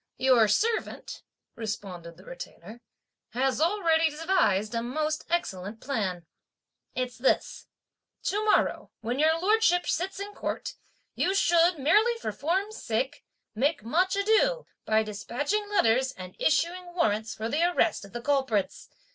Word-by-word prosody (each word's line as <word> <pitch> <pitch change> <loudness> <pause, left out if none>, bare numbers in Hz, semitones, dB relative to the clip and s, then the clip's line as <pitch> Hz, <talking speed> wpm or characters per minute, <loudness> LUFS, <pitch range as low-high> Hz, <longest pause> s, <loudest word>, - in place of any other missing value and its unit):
"Your 255 -4 +5
servant," 445 - -1 0.3
responded 185 -7 -6
the 185 - -16
Retainer, 205 +6 -10 0.5
"has 265 +4 0
already 330 -3 +3
devised 300 - +1
a 230 - 0
most 305 +6 -2
excellent 220 - -2
plan. 195 -11 -3 0.7
It's 250 -2 -3
this: 260 - 0 0.6
To 415 +2 0
morrow, 425 - +2
when 245 +4 -2
your 320 +2 +3
Lordship 370 -2 +3
sits 380 +3 -2
in 405 +1 -6
court, - - -4 0.4
you 385 - 0
should, 345 -2 +4
merely 425 - +3
for - - -4
form's 385 +8 -2
sake, 260 +6 -2 0.3
make 280 +3 0
much 365 - +1
ado, 445 +5 +2 0.2
by 220 0 +3
despatching 285 - -3
letters 260 - +2
and 185 0 -10
issuing 350 +3 0
warrants 220 - 0
for 220 - -3
the 295 +7 0
arrest 350 -9 +2
of 200 - -12
the 240 - -6
culprits. 265 -8 0
285 Hz, 135 wpm, -27 LUFS, 220-360 Hz, 0.7 s, Your